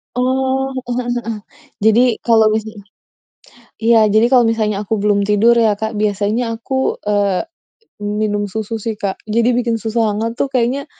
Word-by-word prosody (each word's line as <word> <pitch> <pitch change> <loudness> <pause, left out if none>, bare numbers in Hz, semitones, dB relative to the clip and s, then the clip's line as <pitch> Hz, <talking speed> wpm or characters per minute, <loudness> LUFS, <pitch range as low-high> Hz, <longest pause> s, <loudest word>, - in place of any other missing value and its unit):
Oh, 265 +1 0
heeh 245 -1 -4
heeh 245 - -5
heeh. 240 - -6 0.6
Jadi 220 +2 +5 0.2
kalau 225 -2 +4
misal 220 -1 -5 1.0
iya, 225 -1 +5
jadi 215 +3 +3
kalau 245 -3 +5
misalnya 210 -2 -1
aku 220 - 0
belum 205 -1 +2
tidur 225 +3 +4
ya, 220 -2 +3
Kak, 220 +1 -4
biasanya 215 +3 -1
aku, 265 +3 -2
eee, 205 -2 0 0.6
minum 205 0 -2
susu 220 +3 -4
sih, 220 +1 -4
Kak. 200 -2 -4
Jadi 230 +3 +1
bikin 235 -2 -1
susu 225 0 0
hangat 220 +3 -2
tuh 270 -1 -2
kayaknya 255 +3 0
220 Hz, 160 wpm, -17 LUFS, 210-235 Hz, 1.0 s, Jadi